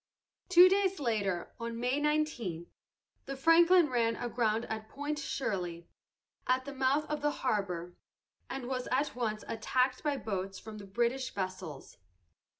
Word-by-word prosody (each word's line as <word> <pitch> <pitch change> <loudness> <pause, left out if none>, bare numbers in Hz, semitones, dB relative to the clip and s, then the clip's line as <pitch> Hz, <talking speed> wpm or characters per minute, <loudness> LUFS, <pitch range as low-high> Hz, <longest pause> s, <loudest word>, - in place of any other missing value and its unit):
Two 360 0 +9
days 385 0 +2
later, 200 -9 -1
on 230 0 -4
May 250 +4 +1
19, 290 - -1 0.6
the 275 - -4
Franklin 335 +4 +6
ran 230 -3 +1
aground 230 -1 0
at 220 0 -5
Point 290 +3 -3
Shirley, 180 - -3 0.6
at 255 0 +2
the 280 - -6
mouth 270 +3 +2
of 300 -1 -3
the 295 - +2
harbor, 190 -10 -2 0.6
and 270 -2 -4
was 255 -1 -3
at 270 +2 +1
once 215 -3 -2
attacked 255 +3 0
by 290 -2 0
boats 195 -4 -4
from 215 -1 -9
the 200 - -10
British 240 +5 0
vessels. 185 -7 -6
245 Hz, 145 wpm, -32 LUFS, 210-285 Hz, 0.6 s, Two